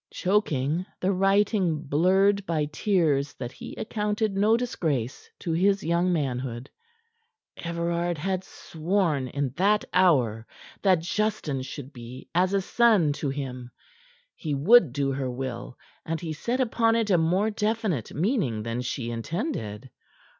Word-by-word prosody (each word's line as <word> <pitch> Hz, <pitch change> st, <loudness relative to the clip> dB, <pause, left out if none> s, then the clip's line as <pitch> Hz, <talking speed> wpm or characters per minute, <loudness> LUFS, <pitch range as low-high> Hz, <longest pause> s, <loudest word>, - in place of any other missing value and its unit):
Choking, 170 Hz, -5 st, 0 dB, 0.2 s
the 185 Hz, -, +1 dB
writing 195 Hz, -4 st, +2 dB
blurred 190 Hz, +7 st, +3 dB
by 155 Hz, -3 st, +1 dB
tears 150 Hz, -3 st, +1 dB
that 120 Hz, -1 st, -6 dB
he -, -, -9 dB
accounted 210 Hz, -1 st, -1 dB
no 215 Hz, +3 st, +4 dB
disgrace 155 Hz, -, -2 dB
to 170 Hz, -, -4 dB
his 195 Hz, +4 st, +2 dB
young 170 Hz, +3 st, +1 dB
manhood, 130 Hz, -5 st, -2 dB, 0.8 s
Everard 170 Hz, 0 st, -2 dB
had 185 Hz, +4 st, -2 dB
sworn 160 Hz, -6 st, -1 dB
in 140 Hz, +1 st, -2 dB
that 205 Hz, +3 st, +3 dB
hour 125 Hz, -12 st, +3 dB, 0.3 s
that 185 Hz, -4 st, +4 dB
Justin 175 Hz, -7 st, -1 dB
should 135 Hz, +1 st, -8 dB
be 120 Hz, +1 st, -10 dB
as 180 Hz, +2 st, +3 dB
a 195 Hz, -, +2 dB
son 205 Hz, -8 st, +3 dB
to 145 Hz, 0 st, -3 dB
him. 130 Hz, -3 st, -5 dB, 0.7 s
He 150 Hz, -3 st, -3 dB
would 170 Hz, -, +6 dB
do 140 Hz, +1 st, 0 dB
her 135 Hz, -1 st, -2 dB
will, 125 Hz, -1 st, -5 dB, 0.3 s
and 165 Hz, 0 st, -3 dB
he 165 Hz, -2 st, -4 dB
set 240 Hz, -, -2 dB
upon 230 Hz, -2 st, +2 dB
it 225 Hz, -3 st, +1 dB
a 180 Hz, -, +5 dB
more 185 Hz, +7 st, +2 dB
definite 210 Hz, -, -1 dB
meaning 160 Hz, -, 0 dB
than 115 Hz, +2 st, -3 dB
she 120 Hz, -1 st, -3 dB
intended. 125 Hz, -, -4 dB
170 Hz, 140 wpm, -26 LUFS, 135-200 Hz, 0.8 s, would